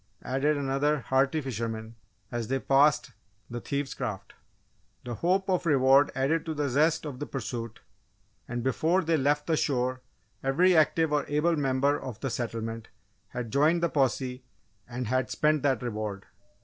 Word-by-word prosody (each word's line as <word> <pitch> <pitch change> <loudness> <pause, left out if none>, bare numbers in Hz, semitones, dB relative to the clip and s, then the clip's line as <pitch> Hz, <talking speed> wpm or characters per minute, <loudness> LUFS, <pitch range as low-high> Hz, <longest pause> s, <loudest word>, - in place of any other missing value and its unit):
added 140 +3 +1
another 140 +1 0
hearty 135 +5 +1
fisherman, 115 -3 -4 0.4
as 120 -2 -3
they 135 - 0
passed 135 0 +3 0.4
the 120 0 -4
thieves' 140 -1 -3
craft. 110 -7 -5 0.7
The 120 - -5
hope 185 - +1
of 180 -2 0
reward 135 -1 +5
added 140 +5 +1
to 160 - -2
the 145 -1 -1
zest 155 +5 +2
of 140 -4 -6
the 145 - -4
pursuit 115 -3 -5 0.7
and 120 -1 -4
before 160 +8 +1
they 165 0 +2
left 145 +1 +1
the 165 - +1
shore 130 -3 0 0.4
every 175 +7 +3
active 160 0 +3
or 150 - +2
able 150 +4 +2
member 140 0 +1
of 125 -4 -7
the 135 - -3
settlement 115 -1 -4 0.4
had 125 -3 -6
joined 155 +5 +3
the 170 - +3
posse 130 -2 0 0.5
and 125 +1 -4
had 130 +2 0
spent 150 -1 +2
that 135 -5 +1
reward! 105 -4 -4
135 Hz, 160 wpm, -28 LUFS, 125-150 Hz, 0.7 s, reward